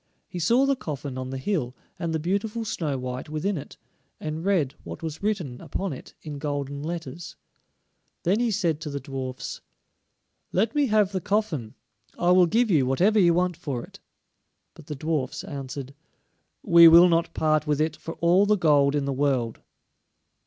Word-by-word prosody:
He 180 - -6
saw 235 +11 +3
the 275 0 +2
coffin 145 - -6
on 130 0 -5
the 135 - -4
hill, 130 -4 -2 0.2
and 170 -1 -2
the 160 - 0
beautiful 205 +7 -2
Snow 150 -9 -2
white 125 +1 -5
within 155 +7 -1
it, 145 - -8 0.4
and 155 +1 -4
read 175 -9 +1
what - - -8
was 160 -1 -5
written 185 -12 -2
upon 195 -5 -3
it 130 - -11
in 150 -2 -6
golden 145 -1 -3
letters. 165 0 -6 0.9
Then 190 +6 +2
he 240 -1 +1
said 170 -7 0
to 160 - -5
the 140 -1 -4
dwarfs: 130 -2 -6 0.9
"Let 215 +5 +1
me 290 -2 +2
have 210 -3 +3
the 190 -2 -2
coffin, 180 - -1 0.4
I 175 0 +2
will 180 -1 +6
give 225 +4 +2
you 140 -7 +3
whatever 190 +11 +3
you 170 -3 +5
want 180 0 +1
for 140 -8 -4
it." - - -14 0.7
But 160 -3 -15
the 150 - -5
dwarfs 150 -2 -2
answered: 140 -1 -6 0.7
"We 170 0 +8
will 170 +2 +9
not 170 -1 +1
part 155 -1 +1
with 150 -1 +1
it 155 0 0
for 165 - -8
all 180 +4 +3
the 210 0 +3
gold 145 -4 +3
in 145 -1 0
the 140 - -1
world." 130 -4 0
160 Hz, 180 wpm, -25 LUFS, 140-185 Hz, 0.9 s, will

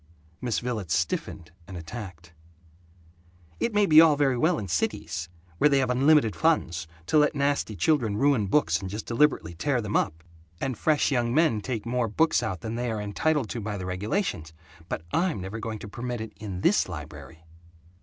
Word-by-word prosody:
Miss 120 -3 -1
Villets 115 -8 -2
stiffened, 80 - -3 0.2
and 95 - -8
attacked: 85 -1 -9 1.3
"It 235 - 0
may 205 -1 +3
be 155 -3 +8
all 160 -2 +6
very 140 -3 +2
well 160 +7 +2
in 100 - -4
cities, 85 -1 -2 0.3
where 150 - +5
they 140 - +3
have 130 -2 +1
unlimited 135 - +4
funds, 80 +1 +1 0.2
to 150 - +3
let 150 +1 +3
nasty 140 -6 0
children 115 - +1
ruin 135 -5 +2
books 150 +10 +2
and 95 - -6
just 105 +3 -5
deliberately 120 - +1
tear 130 - 0
them 105 -2 -3
up, 80 +1 0 0.4
and 130 -2 -2
fresh 150 +4 +1
young 120 -2 +1
men 155 -10 +3
take 115 -2 -4
more 120 0 0
books 160 +7 +2
out 95 -7 -3
than 110 - -4
they 120 +1 -2
are 110 -1 -2
entitled 130 +7 0
to 120 - -4
by 105 0 -4
the 95 - -5
regulations, 90 - -2 0.4
but 80 - -3
I'm 170 - +1
never 95 +4 -6
going 110 0 -4
to 105 - -9
permit 120 +3 -5
it 110 0 -7
in 100 -4 -6
this 175 - +3
library!" 75 -1 -9
115 Hz, 185 wpm, -26 LUFS, 95-140 Hz, 1.3 s, be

